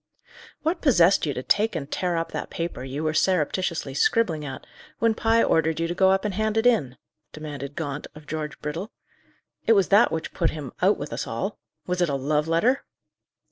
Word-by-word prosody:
"What 325 Hz, +4 st, 0 dB
possessed 190 Hz, -, +4 dB
you 145 Hz, -, 0 dB
to 125 Hz, -, -4 dB
take 215 Hz, +5 st, +2 dB
and 150 Hz, -4 st, -3 dB
tear 180 Hz, -2 st, -1 dB
up 165 Hz, -, -2 dB
that -, -, -4 dB
paper 165 Hz, -6 st, -4 dB
you 135 Hz, +4 st, -4 dB
were 155 Hz, 0 st, 0 dB
surreptitiously 170 Hz, -3 st, 0 dB
scribbling 160 Hz, 0 st, +1 dB
at, 135 Hz, -2 st, -7 dB, 0.3 s
when 230 Hz, -1 st, +2 dB
Pye 225 Hz, +1 st, +3 dB
ordered 160 Hz, 0 st, +2 dB
you 165 Hz, -, +1 dB
to 175 Hz, -, -2 dB
go 190 Hz, +1 st, +4 dB
up 195 Hz, +2 st, +2 dB
and 205 Hz, -, -1 dB
hand 215 Hz, +2 st, 0 dB
it 225 Hz, -, +2 dB
in?" 145 Hz, -, +2 dB, 0.4 s
demanded 145 Hz, -2 st, -7 dB
Gaunt, 145 Hz, -2 st, -4 dB
of 150 Hz, 0 st, -12 dB
George 150 Hz, 0 st, -5 dB
Brittle. 165 Hz, +9 st, -4 dB, 0.8 s
"It 225 Hz, -, +7 dB
was 195 Hz, -3 st, +3 dB
that 205 Hz, +4 st, +5 dB
which 160 Hz, 0 st, -4 dB
put 165 Hz, -, +1 dB
him 150 Hz, -5 st, -6 dB
out -, -, +4 dB
with -, -, -6 dB
us -, -, -3 dB
all. -, -, -3 dB, 0.3 s
Was 180 Hz, 0 st, -1 dB
it 175 Hz, -, +2 dB
a 140 Hz, -, 0 dB
love 150 Hz, +3 st, 0 dB
letter?" 220 Hz, +12 st, +2 dB
165 Hz, 205 wpm, -25 LUFS, 150-200 Hz, 0.8 s, It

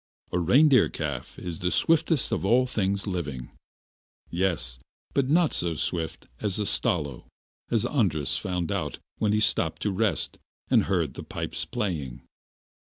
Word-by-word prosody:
A 90 Hz, -, +1 dB
reindeer 130 Hz, -, +5 dB
calf 70 Hz, -6 st, -5 dB
is 85 Hz, -2 st, -6 dB
the 90 Hz, -, 0 dB
swiftest 160 Hz, -, +3 dB
of -, -, -1 dB
all 120 Hz, +6 st, +4 dB
things 100 Hz, -5 st, 0 dB
living. 75 Hz, -, -4 dB, 0.8 s
Yes; 85 Hz, -9 st, -1 dB, 0.3 s
but 135 Hz, -2 st, +1 dB
not 165 Hz, +1 st, +3 dB
so 85 Hz, -2 st, +1 dB
swift 80 Hz, +1 st, -2 dB
as 100 Hz, -3 st, -1 dB
a 105 Hz, -, -1 dB
Stalo, 75 Hz, -9 st, 0 dB, 0.4 s
as 115 Hz, -3 st, +2 dB
Andras 80 Hz, -, +1 dB
found 90 Hz, -3 st, -2 dB
out -, -, -2 dB, 0.2 s
when 105 Hz, -, +2 dB
he 105 Hz, -, +2 dB
stopped 80 Hz, -6 st, +2 dB
to 105 Hz, -, +1 dB
rest, 95 Hz, -, 0 dB, 0.3 s
and -, -, +5 dB
heard 85 Hz, -8 st, 0 dB
the -, -, -7 dB
pipe -, -, -5 dB, 0.2 s
playing! 80 Hz, -, -3 dB
90 Hz, 150 wpm, -27 LUFS, 80-110 Hz, 0.8 s, reindeer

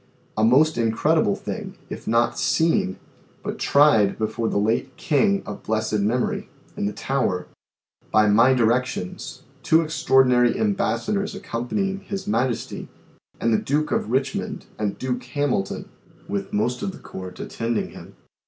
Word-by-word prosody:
A 110 Hz, -, +1 dB
most 140 Hz, +7 st, +4 dB
in 115 Hz, -1 st, +2 dB
credible 150 Hz, -3 st, +2 dB
thing, -, -, -6 dB
if -, -, -8 dB
not 120 Hz, +1 st, +2 dB
seen, 160 Hz, -, +2 dB, 0.5 s
but -, -, -4 dB
tried 140 Hz, -9 st, +4 dB
before 110 Hz, +1 st, -1 dB
the -, -, -1 dB
late 115 Hz, +5 st, 0 dB
king 195 Hz, +4 st, +2 dB
(of -, -, -7 dB
blessed 110 Hz, -1 st, -1 dB
memory) 115 Hz, +5 st, 0 dB, 0.3 s
in 100 Hz, -, -1 dB
the -, -, -1 dB
Tower, 105 Hz, -7 st, -1 dB, 0.7 s
by 110 Hz, 0 st, +5 dB
my 115 Hz, +5 st, +5 dB
directions, 120 Hz, -5 st, -1 dB, 0.2 s
two 160 Hz, +1 st, +4 dB
Extraordinary 130 Hz, -6 st, +3 dB
Embassadors 205 Hz, 0 st, 0 dB
accompanying 195 Hz, -, -2 dB
His 195 Hz, -1 st, -5 dB
Majesty, 130 Hz, -, -1 dB, 0.5 s
and 115 Hz, -, +2 dB
the 110 Hz, -, +3 dB
Duke 150 Hz, +2 st, 0 dB
of -, -, 0 dB
Richmond 130 Hz, +2 st, -1 dB
and 105 Hz, -2 st, -1 dB
Duke 125 Hz, -1 st, -3 dB
Hamilton, 125 Hz, -6 st, -1 dB, 0.4 s
with 100 Hz, -1 st, -3 dB
most 120 Hz, +4 st, 0 dB
of 195 Hz, -, -2 dB
the -, -, -10 dB
Court, 95 Hz, -1 st, -9 dB
attending 115 Hz, -1 st, -2 dB
Him. -, -, -12 dB
125 Hz, 145 wpm, -23 LUFS, 110-150 Hz, 0.7 s, by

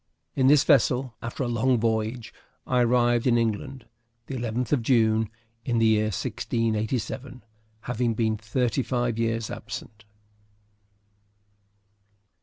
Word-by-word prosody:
In 130 Hz, -1 st, +3 dB
this 145 Hz, 0 st, +6 dB
vessel, 130 Hz, -4 st, +3 dB
after 120 Hz, +3 st, -4 dB
a -, -, -1 dB
long 120 Hz, +1 st, +1 dB
voyage, 110 Hz, +1 st, -1 dB, 0.3 s
I 125 Hz, -1 st, +2 dB
arrived 120 Hz, 0 st, +2 dB
in 120 Hz, -1 st, +4 dB
England 115 Hz, +3 st, -2 dB, 0.4 s
the -, -, -7 dB
11th 120 Hz, -1 st, -3 dB
of 145 Hz, -5 st, +2 dB
June, 110 Hz, -3 st, +2 dB, 0.3 s
in 120 Hz, -3 st, -1 dB
the 115 Hz, -, +3 dB
year 110 Hz, -1 st, +3 dB
1687, 115 Hz, -, -2 dB, 0.4 s
having 120 Hz, -1 st, -1 dB
been 110 Hz, -1 st, +1 dB
thirty 115 Hz, +3 st, -1 dB
five 120 Hz, -3 st, -1 dB
years 115 Hz, -1 st, -1 dB
absent. 110 Hz, +1 st, -8 dB
115 Hz, 120 wpm, -26 LUFS, 110-125 Hz, 0.4 s, this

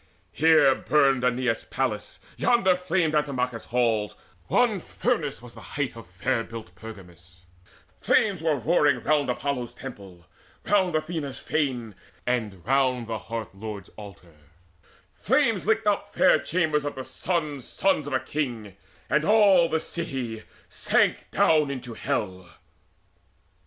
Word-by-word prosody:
Here 155 Hz, -3 st, +5 dB
burned 135 Hz, -2 st, +2 dB
Aeneas' 125 Hz, -2 st, 0 dB
palace, 120 Hz, -6 st, -3 dB, 0.2 s
yonder 195 Hz, -7 st, +3 dB
flamed 180 Hz, -3 st, 0 dB
Antimachus' 130 Hz, -6 st, -1 dB
halls: 115 Hz, -4 st, 0 dB, 0.3 s
one 235 Hz, -5 st, +2 dB
furnace 165 Hz, -, -2 dB
was 120 Hz, -1 st, -10 dB
the 115 Hz, -, -12 dB
height 130 Hz, +7 st, -4 dB
Of 115 Hz, -5 st, -11 dB
fair 115 Hz, +7 st, -1 dB
built 115 Hz, -5 st, -9 dB
Pergamus; 90 Hz, -4 st, -13 dB, 0.6 s
flames 195 Hz, -6 st, +2 dB
were 160 Hz, -2 st, +2 dB
roaring 140 Hz, -1 st, +2 dB
round 150 Hz, -3 st, +2 dB
Apollo's 125 Hz, -1 st, -3 dB
temple, 95 Hz, -9 st, -10 dB, 0.4 s
round 190 Hz, -4 st, +2 dB
Athena's 155 Hz, -3 st, -3 dB
fane, 125 Hz, -8 st, -2 dB, 0.3 s
And 110 Hz, -7 st, -2 dB
round 130 Hz, -1 st, +2 dB
the 110 Hz, -1 st, -4 dB
Hearth 115 Hz, -2 st, -6 dB
lord's 100 Hz, -1 st, -7 dB
altar: 100 Hz, -5 st, -13 dB, 0.9 s
flames -, -, +1 dB
licked -, -, +2 dB
up -, -, 0 dB
Fair -, -, +4 dB
chambers 160 Hz, -4 st, 0 dB
of 145 Hz, -, -4 dB
the 130 Hz, -, -6 dB
sons' 150 Hz, -1 st, -3 dB
sons 190 Hz, -7 st, 0 dB
of 145 Hz, -, -4 dB
a 130 Hz, -, +2 dB
king; 120 Hz, -11 st, -4 dB, 0.3 s
And 150 Hz, -, +2 dB
all 195 Hz, -4 st, +5 dB
the 160 Hz, -, +1 dB
city 130 Hz, -10 st, -4 dB, 0.3 s
sank -, -, +1 dB
down 155 Hz, -3 st, +3 dB
into 125 Hz, -3 st, -6 dB
hell. 95 Hz, -5 st, -3 dB
130 Hz, 130 wpm, -26 LUFS, 110-155 Hz, 0.9 s, Here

